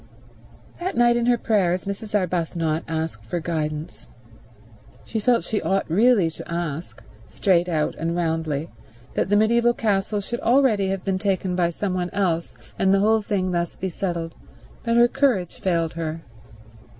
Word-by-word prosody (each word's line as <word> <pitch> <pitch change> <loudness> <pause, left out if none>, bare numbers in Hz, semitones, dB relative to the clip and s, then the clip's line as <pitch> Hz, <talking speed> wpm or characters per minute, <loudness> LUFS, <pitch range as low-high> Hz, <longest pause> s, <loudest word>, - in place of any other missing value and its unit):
That 360 -3 -3
night 240 0 +5
in 240 0 +1
her 245 -1 +4
prayers 190 -6 +1
Mrs. 205 +2 -4
Arbuthnot 165 -3 -1
asked 160 -9 -3
for 145 +10 -3
guidance. 155 -7 -4 1.0
She 225 - -3
felt 235 +2 +2
she 215 - -2
ought 195 0 0
really 200 -1 +4
to 160 - -10
ask, 170 -6 -4 0.2
straight 180 -2 +2
out 155 -3 0
and 165 +1 -1
roundly, 160 -2 -1 0.4
that - - 0
the 205 - +4
mediaeval 235 +2 +3
castle 205 -1 0
should 235 +4 -4
already 235 -5 +3
have 195 -1 -2
been 190 -1 0
taken 190 -2 0
by 175 -1 +2
some 185 +2 -3
one 180 -1 -1
else 175 -4 -1 0.2
and 190 - +3
the 195 - +4
whole 220 +1 +3
thing 190 -3 -1
thus 170 -1 -1
be 190 - -3
settled, 170 -2 -3 0.5
but 230 -1 +1
her 240 0 +7
courage 235 - 0
failed 170 -3 0
her. 165 0 -4
185 Hz, 160 wpm, -23 LUFS, 165-215 Hz, 1.0 s, her